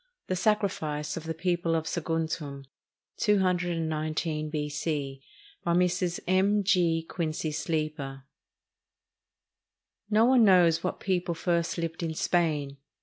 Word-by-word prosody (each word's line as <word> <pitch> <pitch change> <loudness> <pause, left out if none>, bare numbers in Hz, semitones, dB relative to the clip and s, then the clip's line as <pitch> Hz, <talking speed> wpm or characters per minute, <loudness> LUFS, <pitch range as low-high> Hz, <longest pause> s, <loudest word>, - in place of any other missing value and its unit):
THE 185 - -1
SACRIFICE 175 -8 0
OF 160 - -6
THE 160 0 -3
PEOPLE 175 -1 0
OF 160 -1 -1
SAGUNTUM 160 -4 -3 0.5
[219 165 -5 0
B.C.] 150 -2 -3 0.4
BY 170 - +1
MRS. 180 0 +1
M. 195 +3 +3
G. 170 -4 +2
QUINCY 160 -2 -2
SLEEPER 150 -4 -3 1.9
No 220 +1 +4
one 250 -1 +5
knows 180 -5 +5
what 185 - -2
people 180 -3 0
first 170 0 0
lived 165 -1 -3
in 160 -1 -2
Spain. 150 -6 0
165 Hz, 110 wpm, -28 LUFS, 155-180 Hz, 1.9 s, one